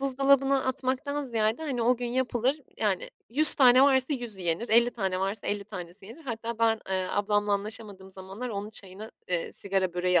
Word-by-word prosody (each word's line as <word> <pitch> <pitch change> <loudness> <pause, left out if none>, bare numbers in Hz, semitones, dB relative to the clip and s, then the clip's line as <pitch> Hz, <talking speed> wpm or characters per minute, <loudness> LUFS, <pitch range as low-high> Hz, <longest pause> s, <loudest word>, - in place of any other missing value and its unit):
buzdolabına 275 0 +2
atmaktan 265 +3 -2
ziyade, 225 +3 -1
hani, 260 -6 -2
o 245 +1 +3
gün 245 0 -4
yapılır 255 +3 -1 0.2
yani 200 -4 -1 0.2
100 305 +5 +8
tane 255 -1 +6
varsa 270 +1 +3
100'ü 240 -7 -4
yenir, 175 +6 -2
50 235 +2 +4
tane 190 -5 -3
varsa 195 +2 -3
50 205 -1 -2
tanesi 190 -1 -9
yenir. 285 +8 -13
Hatta 230 -1 -5
ben, 225 -1 +2
eee, 185 -1 -1
ablamla 205 0 0
anlaşamadığım 200 -2 -5
zamanlar 195 +6 -7
onun 205 0 -5
çayına, 200 +1 -10 0.2
eee, 175 -2 -2
sigara 190 -2 -2
böreği 180 -1 +2
225 Hz, 175 wpm, -27 LUFS, 195-255 Hz, 0.2 s, 100